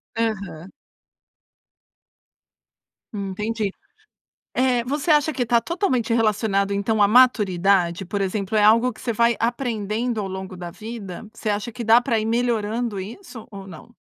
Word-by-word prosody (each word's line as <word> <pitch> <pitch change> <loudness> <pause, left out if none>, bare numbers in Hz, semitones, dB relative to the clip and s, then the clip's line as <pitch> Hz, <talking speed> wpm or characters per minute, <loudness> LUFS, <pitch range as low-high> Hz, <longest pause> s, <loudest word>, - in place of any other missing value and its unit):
Aham. 200 -7 -3 2.4
Entendi. 210 +1 -3 0.9
Eh, 250 -2 +2
você 290 +6 -2
acha 300 0 +4
que 250 -3 -1
tá 235 0 +3
totalmente 255 - -1
relacionado, 210 -3 +1
então, 205 +2 +1
à 200 - +5
maturidade? 195 -7 +3
Por 200 +3 -4
exemplo, 195 +1 -2
é 210 - +4
algo 230 +4 +5
que - - -16
você 240 - -2
vai 235 +1 +2
aprendendo 230 -1 -2
ao 195 - -4
longo 190 0 -7
da 175 -1 -7
vida? 215 -1 -8
Você 220 -1 -3
acha 210 +3 -2
que 245 - -6
dá 225 +2 +6
para 240 -2 0
ir - - -3
melhorando 230 -2 -1
isso 230 - -9
ou 195 -2 -9
não? 195 +6 -13
220 Hz, 145 wpm, -22 LUFS, 200-240 Hz, 2.4 s, dá